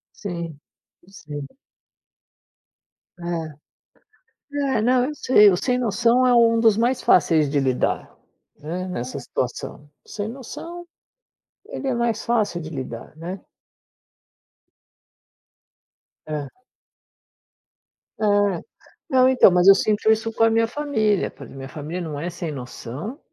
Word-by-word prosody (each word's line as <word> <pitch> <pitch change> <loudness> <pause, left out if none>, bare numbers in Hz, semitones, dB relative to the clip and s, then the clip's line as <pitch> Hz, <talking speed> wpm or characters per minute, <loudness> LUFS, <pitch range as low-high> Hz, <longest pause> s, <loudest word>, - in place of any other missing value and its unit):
Sim, 170 -6 -6 0.5
sim. 150 -7 -8 1.7
É. 165 -4 -5 1.1
É, - - +1
não, 250 +2 +3
eu 300 +2 -4
sei. 210 -7 +6
O 180 - +1
sem 250 +3 0
noção 235 +2 +2
é 250 - +4
um 230 -1 +5
dos 225 -2 +4
mais 240 +3 +1
fáceis 155 -3 +4
de 145 0 +1
lidar, 130 -2 0 0.5
né, 175 +5 -5
nessa 125 -8 -5
situação. 145 - -5 0.2
Sem 205 0 -5
noção, 335 +7 -8 0.8
ele 275 - -5
é 255 - +1
mais 235 -2 -1
fácil 215 -7 0
de 155 - -7
lidar, 130 -1 -7
né. 180 +4 -6 2.9
Hã. 150 -3 -4 1.7
É. - - 0 0.9
Não, 255 -2 +5
então, 260 -6 +6
mas 180 +1 +3
eu 195 - +11
sinto 215 +2 +2
isso 225 +1 0
com 225 - +1
a 225 - +6
minha 225 0 +2
família, 225 -7 0
porque - - -12
minha 135 0 -8
família 155 +5 -6
não 155 -4 -5
é 170 +3 -3
sem 170 -2 -5
noção 140 - -7
195 Hz, 125 wpm, -23 LUFS, 155-235 Hz, 2.9 s, eu